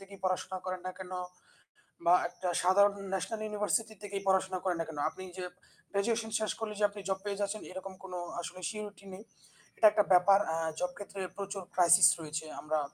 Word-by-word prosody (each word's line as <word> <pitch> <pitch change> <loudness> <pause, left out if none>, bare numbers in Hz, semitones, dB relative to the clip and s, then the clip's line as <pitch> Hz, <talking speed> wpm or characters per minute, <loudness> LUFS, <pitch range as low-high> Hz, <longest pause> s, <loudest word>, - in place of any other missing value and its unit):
থেকে 195 0 -12
পড়াশোনা 185 0 -1
করেন 185 -1 -3
না 185 - -4
কেনো 185 -1 -5 0.9
বা 175 - +8
একটা 180 +1 -5
সাধারণ 200 +3 +6 0.2
ন্যাশনাল 215 +4 -2
ইউনিভার্সিটি 210 +1 0
থেকেই 200 -1 -4
পড়াশোনা 190 -1 +2
করেন 180 -2 +1
না 165 - +1
কেনো, 150 -2 -5
আপনি 185 - -10 0.2
যে 180 - -3 0.5
গ্র্যাজুয়েশন 220 +3 0
শেষ 215 - 0
করলে 215 -1 -3
যে 210 - +4
আপনি 205 0 -9
জব 190 0 0
পেয়ে 200 -1 -3
যাচ্ছেন 205 +1 -1
এরকম 190 +1 -7
কোনো 180 -1 -5 0.2
আসলে 180 +1 -7
surety 210 -2 -7
নেই। 190 - -9 0.5
এটা - - +6
একটা 210 - +4
ব্যাপার 190 +2 +7 0.2
আ - - 0 0.2
জব 180 - 0
ক্ষেত্রে 200 -1 -7 0.2
প্রচুর 200 -1 -4
ক্রাইসিস 175 -1 +7
রয়েছে। 160 0 -4 0.2
আমরা 155 0 0
190 Hz, 185 wpm, -32 LUFS, 180-205 Hz, 0.9 s, বা